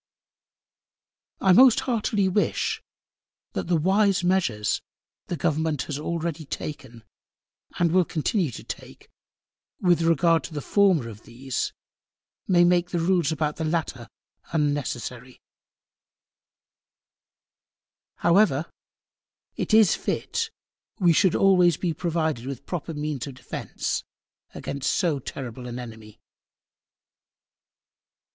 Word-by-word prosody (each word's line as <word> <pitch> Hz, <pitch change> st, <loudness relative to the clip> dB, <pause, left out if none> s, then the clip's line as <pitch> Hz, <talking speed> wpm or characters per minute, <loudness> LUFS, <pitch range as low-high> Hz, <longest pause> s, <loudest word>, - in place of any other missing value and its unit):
I 190 Hz, -, +5 dB
most 255 Hz, +3 st, +7 dB
heartily 215 Hz, -5 st, 0 dB
wish, 195 Hz, +3 st, 0 dB, 0.7 s
that -, -, -3 dB
the 175 Hz, -1 st, +2 dB
wise 195 Hz, +3 st, +2 dB
Measures, 175 Hz, -, +1 dB, 0.5 s
the 175 Hz, -, -3 dB
Government 155 Hz, -3 st, 0 dB
has 145 Hz, -1 st, -5 dB
already 165 Hz, 0 st, -3 dB
taken, 130 Hz, -5 st, -7 dB, 0.7 s
and 170 Hz, -2 st, +2 dB
will 185 Hz, +1 st, +4 dB
continue 165 Hz, +2 st, 0 dB
to 120 Hz, -, -9 dB
take, -, -, -10 dB, 0.7 s
with 175 Hz, -3 st, +3 dB
Regard 165 Hz, 0 st, +3 dB
to 160 Hz, -, -9 dB
the 145 Hz, -, -2 dB
former 185 Hz, -, +3 dB
of 110 Hz, -2 st, -10 dB
these, 130 Hz, +2 st, -4 dB, 0.8 s
may 175 Hz, -2 st, +5 dB
make 175 Hz, 0 st, +3 dB
the 175 Hz, -, -2 dB
Rules 170 Hz, -2 st, +2 dB
about 150 Hz, -1 st, -1 dB
the 160 Hz, -, -3 dB
latter 155 Hz, -7 st, -2 dB, 0.4 s
unnecessary: 130 Hz, -5 st, -2 dB, 2.8 s
However 170 Hz, -4 st, +3 dB, 0.8 s
it -, -, -3 dB
is 215 Hz, -3 st, +6 dB
fit, 455 Hz, -1 st, -2 dB, 0.5 s
we 175 Hz, -3 st, +5 dB
should 185 Hz, +2 st, +3 dB
be -, -, +1 dB
always 180 Hz, -5 st, +4 dB
provided 160 Hz, -6 st, -1 dB
with 135 Hz, -3 st, -6 dB
proper 165 Hz, -2 st, -4 dB
Means 150 Hz, -2 st, -3 dB
of 135 Hz, -, -8 dB
Defence -, -, -4 dB, 0.5 s
against 140 Hz, -1 st, -2 dB
so 160 Hz, -6 st, +1 dB
terrible 125 Hz, -1 st, -7 dB
an 120 Hz, 0 st, -6 dB
Enemy. 110 Hz, -3 st, -10 dB
160 Hz, 110 wpm, -25 LUFS, 140-180 Hz, 2.8 s, most